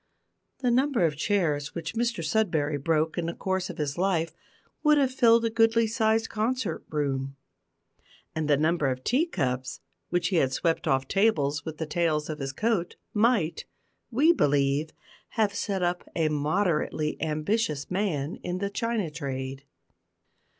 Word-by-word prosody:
The 250 -2 +2
number 255 -5 +3
of 155 -2 0
chairs 150 -4 0
which 165 -2 -4
Mr 235 -7 -1
Sudberry 155 -8 0
broke 160 +1 +1
in 165 - -2
the 170 - -3
course 190 -1 -2
of 180 - -7
his 150 0 -2
life 170 -4 +1 0.5
would 300 -1 +5
have 270 -2 +2
filled 235 -3 +5
a 225 - 0
goodly 225 0 +4
sized 225 0 +1
concert 220 -5 -2
room; 135 -2 -2 1.0
and 160 -1 -2
the 145 -2 +4
number 155 0 +2
of 130 -1 -2
tea 280 - +2
cups 130 - -2 0.3
which 175 -1 +1
he 185 - +1
had 130 -4 +2
swept 165 +4 0
off 135 0 +1
tables 155 -8 +1
with 160 -2 -6
the 160 - -3
tails 155 -1 0
of 150 - -6
his 135 -1 -3
coat 195 - -1 0.2
might, 210 -7 +2 0.4
we 290 +8 +4
believe, 145 - +2 0.5
have 210 -2 +2
set 195 -2 -2
up 175 0 -1
a 160 -2 +2
moderately 155 0 0
ambitious 155 0 -1
man 180 -6 -1
in 180 0 -4
the 200 +1 -2
china 220 -5 -1
trade. 135 -2 -5
170 Hz, 155 wpm, -27 LUFS, 150-220 Hz, 1.0 s, would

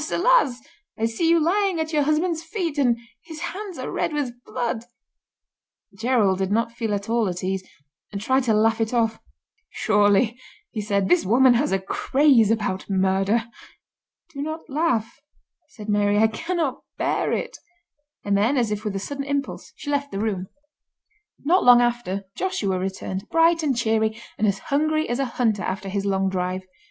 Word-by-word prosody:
alas! 290 - +3 0.3
I 225 - 0
see 230 +9 0
you 335 0 +5
lying 370 +2 +1
at 320 0 -3
your 300 - +3
husband's 315 +3 +1
feet, 330 -3 -3
and 245 -4 +3 0.2
his 320 -2 -10
hands 390 -2 -5
are - - -5
red - - -1
with 290 -4 -1
blood.'" 235 -1 -3 1.1
Gerald 215 -4 +2
did 190 0 -1
not 230 +2 +1
feel 230 -3 -2
at 200 0 -5
all 230 -3 +1
at 180 0 -5
ease, 190 0 -1 0.5
and 200 - -4
tried 260 +5 +1
to 225 - +3
laugh 225 +1 +2
it 225 +2 -1
off. 225 -1 +1 0.5
"Surely," 210 +3 +2 0.3
he 215 - -3
said, 200 -2 0
"this 180 0 +4
woman 245 +6 +5
has 260 +5 +1
a 195 - +3
craze 235 +4 +3
about 205 -4 -1
murder." 195 +3 +2 0.9
"Do 280 - -5
not 315 +2 -5
laugh," 265 -7 0 0.5
said 215 -9 -11
Mary, 205 -1 +2
"I 220 - +5
cannot 310 +5 -2 0.2
bear - - 0
it," - - -3 0.7
and 200 0 +1
then, 225 +8 +2
as 235 -4 +1
if 210 0 -3
with 210 -3 -3
a - - -1
sudden 275 +7 -5
impulse, 280 0 -3
she 290 - -5
left 285 0 -1
the - - -4
room. 200 -4 -2 1.0
Not 360 +5 +4
long 245 -1 +8
after 240 -5 0
Joshua 200 - -1
returned, 190 +1 -4
bright 330 0 +4
and 280 -6 0
cheery, 220 -1 +1 0.2
and 215 - +2
as 200 -1 +1 0.2
hungry 310 +2 +1
as 240 +2 -2
a 275 - +1
hunter 220 -5 +1
after 195 +1 -3
his 200 +1 -2
long 195 -1 +1
drive. 185 0 -2
230 Hz, 175 wpm, -23 LUFS, 200-290 Hz, 1.1 s, long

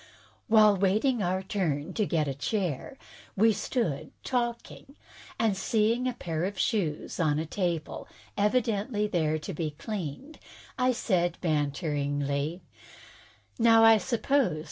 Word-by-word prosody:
While 215 -3 +6
waiting 215 +6 +2
our 185 +1 -1
turn 165 -8 -2
to 210 -3 0
get 155 -3 0
a 135 - -1
chair, 180 - -3 0.4
we 220 +2 +5
stood 195 - -2
talking, 240 +2 -3 0.4
and, 220 -3 +1
seeing 225 +5 +1
a 250 - -1
pair 165 -7 -3
of 200 +1 -4
shoes 190 - -1
standing 155 -4 +1
on 150 - -1
a - - -7
table, 170 -2 -3 0.3
evidently 210 0 +1
there 160 -6 0
to 170 +5 -6
be 155 0 -2
cleaned, 215 - -6 0.4
I 255 -1 +2
said 175 -8 0
banteringly: 145 0 -1 1.0
"Now, 225 -1 +6
I 225 -1 +7
suppose. 240 - +1
195 Hz, 130 wpm, -28 LUFS, 155-225 Hz, 1.0 s, I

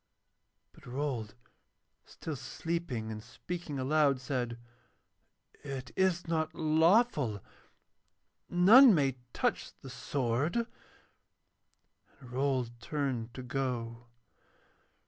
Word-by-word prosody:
And - - -17
Rold, 125 -5 -3 0.7
still 160 - -6
sleeping 140 -6 -4
and 110 0 -6
speaking 150 +5 -6
aloud, 140 0 +2
said: 125 -3 -3 1.1
'It 135 -2 -6
is 185 -2 +1
not 160 -1 -1
lawful; 160 - +3 1.1
none 215 +7 +8
may 135 -4 +1
touch - - -1
the - - -9
sword.' 140 - -1 1.5
And 125 -3 -13
Rold 130 -2 0
turned 125 -3 -3
to 130 - -6
go. 120 -3 -3
140 Hz, 90 wpm, -31 LUFS, 120-160 Hz, 1.5 s, none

